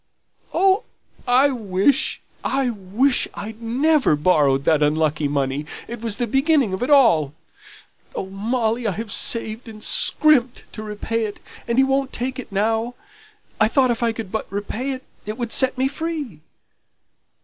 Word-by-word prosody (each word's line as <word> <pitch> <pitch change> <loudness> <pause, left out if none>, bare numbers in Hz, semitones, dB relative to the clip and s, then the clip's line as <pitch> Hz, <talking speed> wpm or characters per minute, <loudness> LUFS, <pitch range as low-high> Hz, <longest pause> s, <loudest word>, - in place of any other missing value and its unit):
"Oh, 385 +2 +2 0.4
I 255 +3 +5
wish 215 +2 +1 0.2
I 265 -2 0
wish 220 +6 0
I'd 220 +2 -8
never 265 - +2
borrowed 145 -4 +2
that 155 0 +2
unlucky 150 0 +1
money, 140 +1 -2 0.2
it 235 -1 -7
was 225 -3 0
the 240 - 0
beginning 270 - +2
of 190 - -4
it 250 - -1
all. 190 - +4 0.8
Oh, - - -3
Molly, 225 +4 -1
I 200 - 0
have 220 +1 -6
saved 225 +2 +2
and 215 -1 -11
scrimped 265 -6 +3
to 215 - -7
repay 215 +2 -3
it, 205 - -7 0.3
and 235 0 -1
he 265 - +6
won't 270 0 0
take 255 +2 -3
it 250 - -8
now; 225 +4 0 0.6
I 215 - +5
thought 255 +1 +2
if 235 - -3
I 235 -1 +2
could 225 -4 -7
but 220 - -4
repay 205 +6 -4
it, 260 0 -8 0.2
it 215 +1 -4
would 235 -2 -4
set 260 -1 +2
me 260 +1 +2
free." 285 - -5
230 Hz, 160 wpm, -21 LUFS, 200-260 Hz, 0.8 s, he